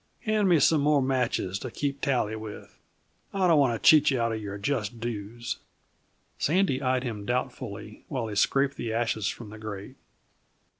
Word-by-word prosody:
Hand 215 -3 +2
me 170 -3 +5
some 150 +1 +4
more 145 0 +4
matches 125 -7 0
to 130 - -5
keep 140 +3 -3
tally 120 -6 +1
with. 110 -1 -9 0.6
I 190 -1 +2
don't 165 -4 +5
want 130 -5 +3
to - - 0
cheat 155 -2 +8
you 130 -3 +1
out 115 0 +1
of 110 -1 -3
your 100 -1 -5
just 115 0 -2
dues." 115 0 -4 0.8
Sandy 160 -4 +2
eyed 130 -1 +1
him 110 -5 -4
doubtfully 125 +4 -4
while 130 -4 -2
he 105 - -5
scraped 135 +6 +2
the 115 - -3
ashes 110 -3 0
from 110 -3 -5
the 110 - -10
grate. 110 +4 -7
120 Hz, 180 wpm, -27 LUFS, 110-140 Hz, 0.8 s, cheat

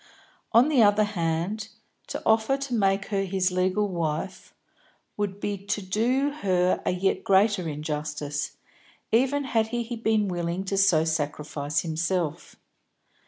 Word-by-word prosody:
On 235 +5 +6
the 290 -6 +4
other 210 0 +5
hand, 190 +2 -2 0.4
to - - -5
offer 220 +4 +3
to 275 -2 -5
make 195 -3 +1
her 200 -2 0
his 190 -1 0
legal 185 +3 +1
wife 175 +1 -3 0.6
would 205 -1 -3
be 205 -1 -3
to 205 - 0
do 235 +9 0
her 185 -2 +2
a - - +4
yet 185 +2 0
greater 195 -3 +3
injustice, 150 -1 -4 0.6
even 270 +5 +2
had 225 -4 +1
he 240 +1 -3
been 220 -2 +1
willing 175 0 -2
to 195 +1 -2
so 195 -5 +4
sacrifice 150 -1 -2
himself. 165 0 -2
195 Hz, 135 wpm, -26 LUFS, 170-220 Hz, 0.6 s, On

